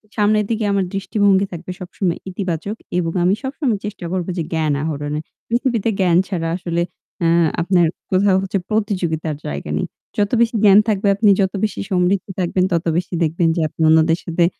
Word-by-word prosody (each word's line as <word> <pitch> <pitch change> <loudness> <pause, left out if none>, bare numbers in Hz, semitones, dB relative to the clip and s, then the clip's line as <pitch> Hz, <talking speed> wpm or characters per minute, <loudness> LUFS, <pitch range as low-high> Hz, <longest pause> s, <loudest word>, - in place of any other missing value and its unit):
সামনের 210 0 +2
দিকে 225 -1 -1
আমার 200 -1 +1
দৃষ্টিভঙ্গি 200 0 +2
থাকবে 175 +1 -7
সবসময় 180 -1 -2
ইতিবাচক 185 +1 -3 0.2
এবং 165 -2 0
আমি 185 +2 +4
সবসময় 265 -5 -1
চেষ্টা 210 -4 -6
করব 185 -2 -2
যে 170 - 0
জ্ঞান 155 -2 +1
আহরণে। 150 -1 -3 0.3
পৃথিবীতে 235 -2 0
জ্ঞান 180 -3 +4
ছাড়া 170 -4 -2
আসলে 170 -2 -2 0.4
আ - - +4 0.3
আপনার 175 0 +3 0.3
কোথাও 190 0 +4
হচ্ছে 195 +1 -2
প্রতিযোগিতার 180 -8 -1
জায়গা 70 +1 -5
নেই। - - -1 0.3
যত 205 -1 +1
বেশি 235 0 +2
জ্ঞান 200 -1 +8
থাকবে, 205 -2 +1
আপনি 210 0 +3
যত 190 -1 0
বেশি 215 - -1
সমৃদ্ধ 185 +1 +2
থাকবেন, 180 +1 +1
তত 170 -1 0
বেশি 180 +1 -3
দেখবেন 165 +1 +1
যে 170 - 0
আপনি 155 - -9
অন্যদের 160 +1 +4
সাথে 170 0 +1
185 Hz, 175 wpm, -19 LUFS, 170-205 Hz, 0.4 s, জ্ঞান